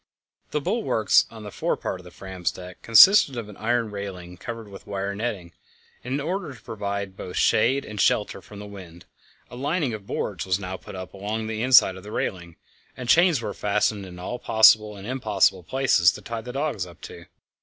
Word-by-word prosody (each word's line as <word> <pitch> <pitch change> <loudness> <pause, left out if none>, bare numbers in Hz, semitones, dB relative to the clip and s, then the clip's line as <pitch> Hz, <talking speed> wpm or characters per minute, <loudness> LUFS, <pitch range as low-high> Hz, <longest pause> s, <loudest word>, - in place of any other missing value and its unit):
The 150 - -1
bulwarks 175 - +2
on 110 -1 -11
the 105 - -8
fore - - -1
part 95 - -4
of - - -13
the - - -10
Fram's 95 -1 -4
deck 90 +1 -11
consisted 135 - +7
of 110 -3 -5
an 105 - -12
iron 115 -1 0
railing 95 -3 -7
covered 115 +3 -7
with 100 -1 -12
wire 100 0 -3
netting. 100 -5 -4 0.5
In 130 +3 -2
order 165 -1 -3
to - - -15
provide 100 -3 -5
both 90 -2 -7
shade 140 +1 +3
and 105 -2 -4
shelter 105 - +1
from 105 - -13
the 105 - -8
wind, 90 -4 -12 0.5
a - - -8
lining 145 0 -1
of 105 -2 -8
boards - - -3
was 95 -1 0
now 95 -1 -5
put 95 - -10
up 95 -1 -8
along 105 +3 -4
the 110 0 -3
inside 120 -7 +6
of - - -10
the 105 - -9
railing, 85 -5 -4 0.4
and 125 -1 -6
chains 170 -7 +4
were 105 -2 -3
fastened 105 -1 0
in 90 -1 -11
all 105 +7 -5
possible 110 -1 +5
and 95 - -10
impossible 105 -7 +1
places 95 -4 +3
to - - -9
tie 115 -1 -5
the 125 - -7
dogs 135 -9 -2
up 85 - -15
to. - - -11
105 Hz, 205 wpm, -24 LUFS, 95-120 Hz, 0.5 s, consisted